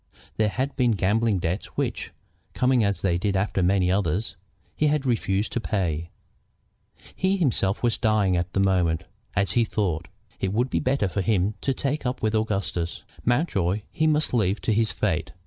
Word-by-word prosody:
There 110 -1 +3
had 130 +6 -2
been 125 -3 +3
gambling 105 +2 +2
debts 90 +3 -2
which, - - -2 0.5
coming 125 -2 +3
as 100 -1 -1
they 85 -3 +2
did 100 +1 0
after 95 0 0
many 90 0 +3
others, 95 +2 0 0.4
he 150 - +2
had 145 -1 +1
refused 110 -4 0
to - - -1
pay. 85 -7 -2 1.1
He 190 +1 +1
himself 115 - +1
was 120 -2 +1
dying 105 -4 +2
at 85 +1 -1
the - - +1
moment, 90 -4 +2 0.3
as 100 -3 +1
he 120 - +3
thought. 95 -7 -1 0.3
It 95 0 -1
would 120 +4 0
be - - +1
better 130 -5 +1
for 100 +2 -2
him 100 +1 +1
to 135 -1 0
take 145 +4 -2
up 125 +1 -2
with 110 0 +1
Augustus. 100 -6 -1 0.2
Mountjoy 105 - +1
he 155 - +1
must 155 -2 +1
leave 105 -3 +2
to 110 - +1
his 110 +1 +2
fate. - - -1
105 Hz, 180 wpm, -25 LUFS, 95-120 Hz, 1.1 s, There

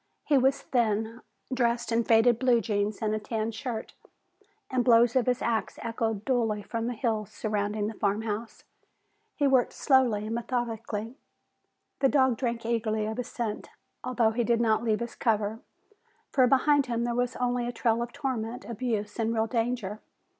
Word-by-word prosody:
He 295 - +3
was 265 +1 +3
thin, 225 -1 0 0.3
dressed 240 -2 0
in 230 +1 +2
faded 230 +1 +4
blue 250 -3 +4
jeans 205 0 -1
and 215 0 +1
a 215 - 0
tan 220 +1 -2
shirt, 225 0 -5 0.7
and 255 - -1
the - - +3
blows 235 0 +5
of 255 -2 +2
his 250 -1 +1
axe 225 -2 -1
echoed 225 -2 -2
dully 225 -5 0
from 230 +1 -3
the 245 - -3
hills 220 -5 -1
surrounding 210 -1 -2
the 220 - -3
farm 205 +1 -1
house. 220 +1 -5 0.7
He 290 - +1
worked 265 -3 +3
slowly 250 -7 +3
and 220 - -3
methodically. 230 -1 -3 0.8
The 270 - +4
dog 260 -4 +3
drank 235 -3 -2
eagerly 220 -2 0
of 220 +1 -4
his 250 -1 -3
scent, 225 -4 -4 0.3
although 240 -3 +2
he 240 +2 0
did 235 0 +2
not 220 -2 +2
leave 225 -1 0
his 235 - -4
cover, 220 -1 0 0.7
for 255 -2 +4
behind 280 +1 +3
him 235 -1 -1
there 240 0 -1
was 245 +1 -1
only 245 -1 0
a - - -2
trail 230 -1 +1
of 240 0 -4
torment, 245 -4 -4
abuse 225 -2 -3
and 225 0 +1
real 220 -1 +1
danger. 225 -3 -2
230 Hz, 175 wpm, -28 LUFS, 220-245 Hz, 0.8 s, blows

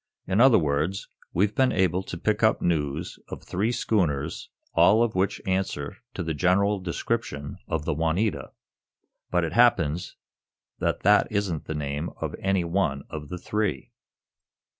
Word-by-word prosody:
"In 95 +4 +2
other 130 -3 +7
words, 80 +3 -1 0.2
we've 100 +4 +1
been 130 -1 +3
able 95 -1 +1
to 90 - -7
pick 105 +5 0
up 110 -1 +4
news 80 -1 -1
of - - -8
three 105 +6 -1
schooners, 85 - -1 0.2
all 110 +3 +5
of 120 - 0
which 95 +2 0
answer 95 -4 -2 0.2
to 95 - -2
the 80 -1 -2
general 95 +5 +2
description 85 -5 -3
of 80 -2 -2
the 80 - 0
'Juanita' 85 +7 -1 0.8
but 90 -1 +1
it 80 0 -2
happens 95 -8 +3 0.6
that - - -1
that 105 +2 +4
isn't 100 -7 -1
the 80 - -4
name 75 +2 -3
of - - -3
any 95 -2 +1
one 85 -5 0
of 75 -2 -6
the 90 - -5
three." 100 -7 -2
90 Hz, 155 wpm, -26 LUFS, 80-100 Hz, 0.8 s, other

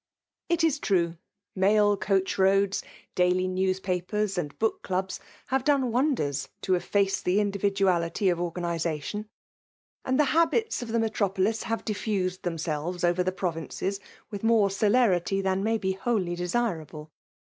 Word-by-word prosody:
'H'ik 325 -4 +2
true, 170 -4 +1 0.4
mail 205 +2 +4
coacli 195 -1 0
roads, 195 +1 +3 0.3
daily 180 +1 +2
newspaj)^/ 185 -1 -1
Md 195 -8 -2
book*club6, 190 -3 -1 0.3
have 265 -1 +1
done 270 -4 +2
wonders 235 - 0
to - - -2
etRace' 195 +2 +1
tfiis 180 +2 +1
individuality 195 -3 +1
of 175 -1 0
organization; 170 +3 -3 0.7
and 260 +2 0
the^ 300 - +5
IkAsi^ 335 - +1
of 240 - -5
the 230 +1 0
metropolis 215 -1 0
have 225 0 -3
diffused 200 -3 -2
theiA 175 - -2
^ - - -6
sfelves 165 +2 -3
over 175 +1 +2
the 185 +1 0
provinces 185 +2 -3 0.3
with 205 -2 -5
more 225 -3 +4
celerity 195 -3 +2
tiian 190 0 +1
may 225 +2 +1
be 190 -3 -1
wholly 190 -2 -1
desirable. 175 -5 -3
195 Hz, 135 wpm, -27 LUFS, 180-215 Hz, 0.7 s, the^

